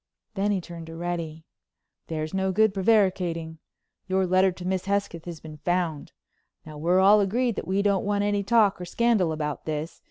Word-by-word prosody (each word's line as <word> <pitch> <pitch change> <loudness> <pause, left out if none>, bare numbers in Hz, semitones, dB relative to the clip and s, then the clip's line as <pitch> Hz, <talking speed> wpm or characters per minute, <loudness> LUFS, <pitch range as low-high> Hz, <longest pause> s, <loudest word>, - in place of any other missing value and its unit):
Then 205 0 0
he 200 -2 +1
turned 170 -2 -9
to 165 - -9
Reddy: 165 -2 -4 0.6
"There's 155 0 -4
no 190 0 0
good 215 +1 +3
prevaricating. 185 -6 +1 0.5
Your 190 0 +1
letter 185 +1 +3
to 180 0 -9
Miss 185 0 -1
Hesketh 200 -4 -2
has 170 -3 -7
been 155 -1 -10
found. 165 -1 -2 0.5
Now 155 -1 -9
we're 175 +4 +3
all 205 +2 +6
agreed 235 +4 0
that - - -4
we 195 +2 +1
don't 200 -2 +2
want 205 0 0
any 205 0 +1
talk 205 -2 +3
or - - -4
scandal 215 -3 +1
about 150 -2 -4
this. 155 +1 -4
185 Hz, 185 wpm, -26 LUFS, 165-200 Hz, 0.6 s, all